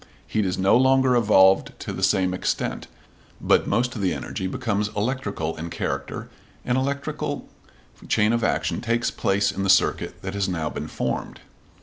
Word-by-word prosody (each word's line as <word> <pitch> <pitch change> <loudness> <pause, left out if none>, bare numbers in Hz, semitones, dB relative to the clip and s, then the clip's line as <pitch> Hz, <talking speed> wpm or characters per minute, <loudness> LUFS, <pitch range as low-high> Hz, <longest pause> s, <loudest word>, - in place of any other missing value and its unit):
Heat 105 -3 0
is 90 - -2
no 95 +3 +4
longer 130 0 +4
evolved 95 -5 +4
to - - -6
the - - -6
same 95 -1 +2
extent, 90 - -2 0.5
but - - +2
most 120 +3 +1
of 110 - -4
the 95 -2 +1
energy 95 - -4
becomes 105 -1 -1
electrical 105 - -2
in 80 +2 -5
character, - - -4 0.4
and 125 - +1
an 130 - +1
electrical 140 +1 -3 0.6
chain 105 +2 +3
of 115 -1 0
action - - 0
takes 115 0 0
place 100 +1 +1
in 95 - -4
the 95 - -1
circuit - - +2
that 95 0 -4
has 100 -1 -1
now 80 -4 -2
been - - -5
formed. - - -3
100 Hz, 170 wpm, -24 LUFS, 95-120 Hz, 0.6 s, no